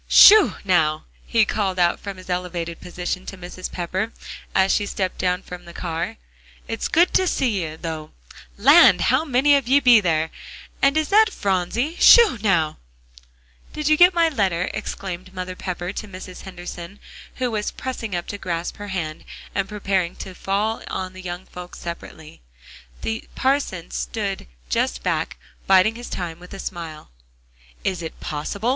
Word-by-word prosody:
"Sho, 425 -1 +8
now!" 155 -5 +2 0.2
he 225 -2 +3
called 195 -3 -1
out 175 -1 +2
from 200 -2 -7
his 185 - -12
elevated 180 -2 -3
position 180 +1 -4
to 195 - -7
Mrs. 180 +1 -7
Pepper, 185 +5 -2 0.4
as 190 0 +4
she 205 - 0
stepped 190 -2 -3
down 180 0 0
from 180 0 -9
the 170 - -11
car, 170 -1 -3 0.5
"it's - - -2
good 340 +3 +3
to 375 - +3
see 235 - +1
you, 160 0 -6
though. 160 -2 -5 0.5
Land! 285 +11 +7
how - - +3
many 285 0 +4
of 275 -4 0
ye 275 +3 +5
be 245 -4 +7
there? 160 -3 0 0.5
And 275 +2 +4
is 310 -1 0
that 435 +2 +6
Phronsie? 205 - -1
Sho, 455 - +8
now!" 170 -7 +1 1.0
"Did 305 -1 -1
you 310 - +6
get 355 +3 +6
my 335 -1 +4
letter?" 190 - 0
exclaimed 185 0 -6
Mother 185 0 -5
Pepper 180 0 -4
to 215 - -6
Mrs. 185 -1 -9
Henderson, 180 0 -8 0.4
who 250 -2 -1
was 210 -1 -1
pressing 230 -6 -5
up 175 - -3
to 205 - -5
grasp 170 -2 -3
her 205 - -7
hand, 170 -5 -4 0.3
and 195 0 -1
preparing 195 -4 -1
to 190 - -8
fall 205 +4 -1
on 185 -1 -4
the 185 - -10
young 180 0 -6
folks 180 0 -10
separately. 160 - -9 0.6
The 225 0 -3
parson 260 -11 0
stood 200 -4 -3 0.2
just - - -1
back, - - -1 0.3
biding 190 +3 +5
his 240 +1 -9
time 170 -2 -5
with 180 +2 -11
a - - -9
smile. 165 - -7 0.7
"Is 185 -3 -1
it 160 - -7
possible?" 195 +9 -3
185 Hz, 165 wpm, -22 LUFS, 175-225 Hz, 1.0 s, Sho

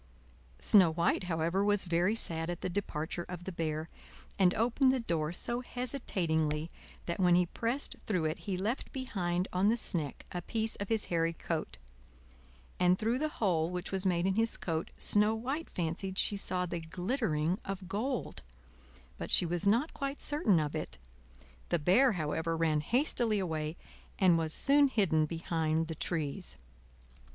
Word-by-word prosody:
Snow 185 -6 +5
White, 170 +3 +1
however, 170 +3 0
was 205 -1 +2
very 175 +5 +2
sad 165 -6 -1
at 175 - -4
the - - -2
departure 175 -3 -3
of 175 -1 -6
the 190 - -5
Bear, 160 -2 -3 0.5
and 185 -2 +5
opened 245 +4 +3
the 260 - +1
door 165 -8 -1
so 240 +7 -1
hesitatingly 170 - -2 0.3
that 170 - -3
when 180 -2 +5
he 180 0 +4
pressed 235 +9 -2
through 180 -7 0
it 155 +1 -1
he 195 -3 -3
left 215 +8 -2
behind 185 -9 -2
on 185 +3 +3
the 230 - +2
sneck 155 - -2
a 175 - -3
piece 220 +4 -2
of 200 - -5
his 225 -2 +1
hairy 165 0 +1
coat; 160 - -4 1.0
and 180 0 +4
through 230 +5 0
the 310 +1 0
hole 170 -6 +1
which 180 0 -5
was 190 -1 -1
made 180 -2 +1
in 190 - +2
his 225 +3 +2
coat 160 -2 -3
Snow 210 +1 +3
White 270 +8 -3
fancied 180 +3 -3
she 205 - +4
saw 185 -2 -1
the 175 -1 -4
glittering 175 - -1
of 195 -1 -5
gold; 235 +7 -3 0.8
but - - -5
she - - +6
was 175 +3 0
not 240 +10 +2
quite 275 0 -4
certain 290 - +3
of 150 -2 -2
it. - - -4 0.7
The - - +2
Bear, 205 - +4
however, 165 0 -1
ran 155 -2 +2
hastily 235 - +2
away, 160 -3 -2 0.4
and 185 -3 +5
was 160 -1 0
soon 280 - +4
hidden 165 - +2
behind 160 -1 -1
the 160 - -4
trees. 150 - -3
180 Hz, 165 wpm, -32 LUFS, 165-220 Hz, 1.0 s, she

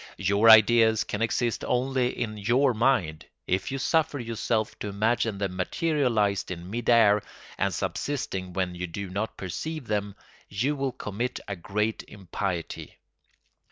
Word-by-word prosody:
Your 100 +3 +3
ideas 110 0 +6
can 105 - -4
exist 115 0 0
only 130 0 +1
in 110 -2 -2
your 120 +6 +2
mind; 110 -10 +1 0.2
if 95 +7 -1
you 135 - -2
suffer 155 +2 +1
yourself 115 -2 -2
to - - -4
imagine 110 +1 0
them 95 -2 -3
materialised 115 - 0
in 90 +1 -7
mid 120 +1 -3
air 105 -3 +5 0.4
and - - +1
subsisting 95 -10 -3
when 90 -1 -1
you 90 +1 -4
do 95 +2 -6
not 105 +4 -3
perceive 145 - -5
them, 105 -2 -2 0.3
you 125 +9 0
will 135 -1 -1
commit 120 0 -4
a 100 - -3
great 105 +5 -2
impiety. 95 -3 -5
110 Hz, 145 wpm, -27 LUFS, 100-125 Hz, 0.4 s, ideas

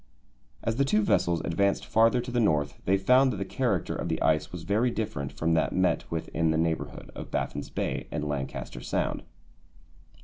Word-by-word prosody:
As 115 0 -1
the 140 - +4
two 110 -6 +2
vessels 85 -4 +2
advanced 100 +4 +1
farther 115 +2 +4
to 125 +1 -6
the 120 - +1
North 75 -9 +2
they 95 +1 +3
found 125 +7 +4
that 105 - -4
the 100 - -3
character - - -1
of - - -3
the - - -1
ice 80 0 +1
was 90 -2 -7
very 110 +7 +2
different 70 - -3
from 80 +1 0
that 80 - +1
met 95 0 +1
with 80 -1 -3
in 80 +1 +1
the 80 - +2
neighbourhood 80 0 -2
of - - -8
Baffin's - - -3
Bay - - -3
and 75 0 -3
Lancaster 65 -3 -4
Sound. - - -1
90 Hz, 195 wpm, -28 LUFS, 80-110 Hz, -, the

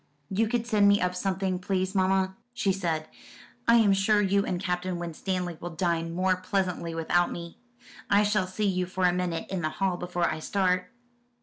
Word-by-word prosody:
"You 215 +4 +2
could 235 +1 -1
send 210 -4 +3
me 200 0 +5
up 180 0 0
something, 190 0 -1
please, 185 0 -1
mamma," 190 0 +2 0.2
she 195 -5 +1
said. 165 -4 -2 0.6
"I 230 - +7
am 215 -4 +5
sure 200 +2 +3
you 200 0 +2
and 180 - -2
Captain 180 -1 -2
Winstanley 175 0 -3
will 175 - -4
dine 165 -1 -1
more 185 0 +2
pleasantly 185 -3 -2
without 175 +2 +1
me. 170 -1 -8 0.5
I 200 +1 +5
shall 205 -3 +1
see 210 +3 -2
you 185 -2 0
for 185 0 -1
a 180 - +4
minute 175 -2 -2
in 190 -2 -2
the 155 - 0
hall, 185 +2 -1
before 175 -1 -1
I - - -2
start." 185 +1 0
185 Hz, 190 wpm, -27 LUFS, 175-195 Hz, 0.6 s, I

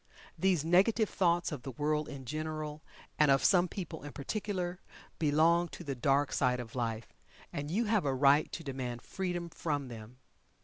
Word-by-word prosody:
These 180 -5 +2
negative 200 +6 +4
thoughts 175 -2 +2
of 145 -5 -5
the 135 - -6
world 150 +3 -1
in 135 -2 -8
general, 155 +2 -4 0.4
and 150 -2 +5
of 135 -1 +4
some 180 -1 +5
people 170 -3 -6
in 145 0 -8
particular, 180 +3 -3 0.4
belong 165 +3 +4
to 175 - -9
the 140 -4 -3
dark 135 +3 +1
side 125 -2 +2
of 115 -2 -7
life, 115 -2 -3 0.4
and 145 -2 -4
you 215 +8 +1
have 210 -5 +2
a 135 -1 +1
right 140 +3 +4
to 165 - -5
demand 130 -4 -4
freedom 175 -2 -3
from 145 -4 -3
them. 115 +1 -10
150 Hz, 175 wpm, -32 LUFS, 135-175 Hz, 0.4 s, and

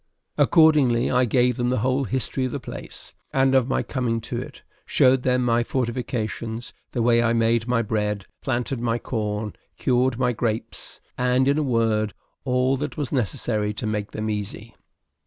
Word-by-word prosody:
Accordingly, 145 -7 +4
I 125 0 +3
gave 125 +1 +2
them 120 0 0
the 130 - +1
whole 130 +2 +1
history 130 +1 -1
of 130 - -3
the 145 - -3
place, 125 - -9 0.2
and 135 0 +3
of 130 -2 +4
my 135 - 0
coming 120 -4 -1
to 120 +1 -4
it; - - -11 0.2
showed 130 0 +3
them 125 -1 +1
my 120 0 +2
fortifications, 120 -2 -3 0.2
the 120 - 0
way 115 0 +4
I 115 0 +2
made 115 0 +2
my 120 -1 +2
bread, 105 -2 -1 0.2
planted 125 0 -2
my 115 0 0
corn, 105 -3 -3 0.2
cured 125 -1 +1
my 125 -1 +1
grapes; 115 0 -4 0.2
and, 125 +1 +2
in 140 +2 +3
a - - +1
word, 115 -5 +1 0.3
all 130 +1 +2
that 150 +4 -4
was 145 -5 -3
necessary 105 - -1
to - - -4
make 105 -1 -2
them 110 0 -4
easy. 105 +1 -5
120 Hz, 175 wpm, -24 LUFS, 115-130 Hz, 0.3 s, Accordingly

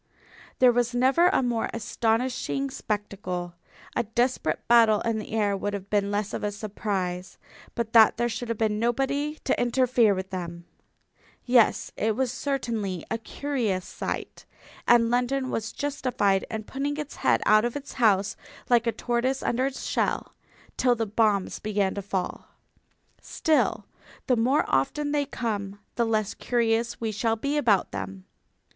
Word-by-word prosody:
There 255 -1 +6
was 240 0 0
never 265 +8 +4
a 360 - +2
more 240 -2 0
astonishing 245 +4 -1
spectacle. 190 -6 -4 0.4
A - - +2
desperate 240 +3 -1
battle 230 -3 +6
in 230 -1 -1
the 215 - -8
air 205 -2 +1
would 205 +1 -2
have 200 0 -8
been 200 -1 +2
less 205 0 -2
of - - -4
a 210 - 0
surprise. 195 -3 -4 0.4
But 230 -1 -3
that 225 -1 +7
there 240 +1 +1
should 235 +1 -4
have 230 - -1
been 215 -1 0
nobody 275 +6 0
to 260 - +1
interfere 245 -3 +3
with 190 0 -5
them!... 170 -2 -6 0.8
Yes, 245 -3 +3
it 220 0 +1
was 260 0 0
certainly 230 - -3
a 225 - -1
curious 230 -7 -2
sight, - - -5 0.4
and 235 -1 +5
London 255 +2 0
was 225 0 -2
justified 250 -9 0
in 220 -1 -4
putting 280 +5 -3
its 300 -1 -6
head - - +2
out 215 0 +5
of 240 0 -2
its 285 -1 -6
house, 205 -5 +2 0.3
like 240 -1 +4
a - - +3
tortoise 245 +3 -1
under 255 +3 +1
its 275 - -6
shell, - - -1 0.4
till 250 -1 +3
the 225 -1 -1
bombs 210 -2 +1
began 205 -2 0
to 200 - -4
fall. 190 -2 -4 0.7
Still, 315 -1 +1 0.4
the 250 - +3
more 250 +6 +2
often 290 - 0
they 290 -1 0
come 205 -6 -3
the 235 - +1
less 215 -2 0
curious 235 -1 0
we 225 -1 -2
shall 225 +2 0
be 280 +6 -2
about 230 -10 +2
them. 95 -1 -6
225 Hz, 160 wpm, -26 LUFS, 205-250 Hz, 0.8 s, that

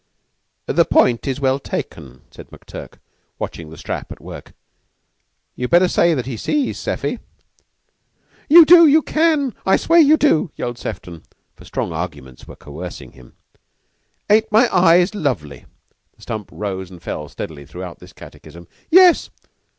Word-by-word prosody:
"The - - +2
point 120 0 +2
is 135 0 -2
well 135 -1 0
taken," 65 - -7
said - - -14
McTurk, - - -11 0.4
watching 80 -2 -7
the 80 - -12
strap - - -6
at - - -10
work. - - -11 1.0
"You'd 125 - -4
better 175 +2 +4
say 170 -2 +2
that 125 - -3
he 125 -3 -6
sees, 290 - -2
Seffy." - - -3 1.3
"You 330 +2 +9
do 335 0 +8
you 305 +1 +4
can! 305 -5 +1
I 190 - +3
swear 335 +1 +3
you 310 0 +6
do!" 185 - +2
yelled 120 0 -5
Sefton, 90 -5 -8 0.3
for - - -17
strong - - -4
arguments 75 -7 -7
were - - -11
coercing 85 +5 -10
him. 65 -2 -19 0.9
"Aren't 215 +1 +2
my 225 +3 +4
eyes 180 +2 +4
lovely?" 120 - -4 0.5
The - - -20
stump 110 -3 -6
rose 95 -3 -5
and 90 -2 -13
fell 75 -3 -7
steadily 70 -3 -9
throughout 90 +2 -9
this 90 +1 -15
catechism. 85 0 -14 0.2
"Yes." 360 0 +5
125 Hz, 150 wpm, -19 LUFS, -, 1.3 s, You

